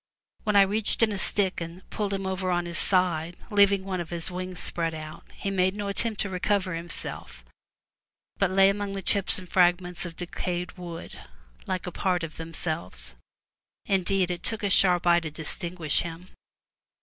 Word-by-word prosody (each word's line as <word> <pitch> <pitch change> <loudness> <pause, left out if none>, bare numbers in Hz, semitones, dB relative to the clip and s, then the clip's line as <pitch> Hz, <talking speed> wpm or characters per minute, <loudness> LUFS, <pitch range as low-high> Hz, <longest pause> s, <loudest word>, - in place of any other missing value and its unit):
When 210 -1 +1
I 200 - +9
reached 210 +3 +1
in 220 - +4
a 200 - -2
stick 190 -2 +1
and 170 +2 -7
pulled 205 -2 -1
him 195 -1 -2
over 190 0 -1
on 175 -1 +1
his 170 0 -2
side, 175 -3 +2
leaving 200 -1 +5
one 185 -2 -2
of 170 - -7
his 170 +1 -3
wings 185 0 -4
spread 165 -1 -1
out, 155 +1 -8
he 195 - -3
made 185 0 +2
no 205 -1 -3
attempt 215 +2 -1
to 200 - -1
recover 185 0 +1
himself, 165 - -5 0.9
but 195 - +2
lay 195 +1 +6
among 200 0 -2
the 195 -1 -4
chips 200 0 +2
and 185 - -7
fragments 180 0 +2
of 170 -2 -6
decayed 180 +1 -3
wood, 170 -2 -8 0.5
like 185 -1 -2
a 180 - -4
part 180 -1 0
of 160 -2 -6
themselves. 165 0 -3 0.7
Indeed, 190 -1 +1
it 175 - -4
took 220 -1 -2
a 200 - +1
sharp 180 -2 +5
eye 175 0 +6
to 165 -2 -5
distinguish 160 +1 -1
him. 170 +2 -6
180 Hz, 180 wpm, -27 LUFS, 170-195 Hz, 0.9 s, I